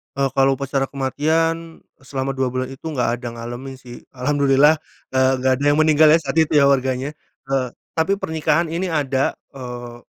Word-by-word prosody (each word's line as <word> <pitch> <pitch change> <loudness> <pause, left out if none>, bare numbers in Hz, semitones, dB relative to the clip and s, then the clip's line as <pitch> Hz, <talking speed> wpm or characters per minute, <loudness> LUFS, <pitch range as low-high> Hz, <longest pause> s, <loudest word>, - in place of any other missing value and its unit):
Eee, 135 0 +1
kalau 135 0 +4
upacara 135 0 -1
kematian, 160 +5 -1 0.2
selama 135 0 -4
2 130 - +1
bulan 130 0 -2
itu 135 +3 -12
nggak 125 -6 -1
ada 125 - -7
ngalamin 120 +3 -7
sih 125 -2 -12
alhamdulillah, 140 +3 +3 0.3
eee, 130 0 +3
nggak 130 0 +2
ada 140 - -5
yang 145 0 +4
meninggal 155 0 +5
ya 165 - +4
saat 165 - -4
itu 160 -1 +3
ya 140 -2 +5
warganya, 135 +2 0 0.3
eee, 135 -2 +1 0.3
tapi 160 +4 +2
pernikahan 160 +1 0
ini 170 +2 -2
ada, 135 -3 0 0.2
eee, 120 -2 -8
135 Hz, 170 wpm, -21 LUFS, 130-155 Hz, 0.3 s, meninggal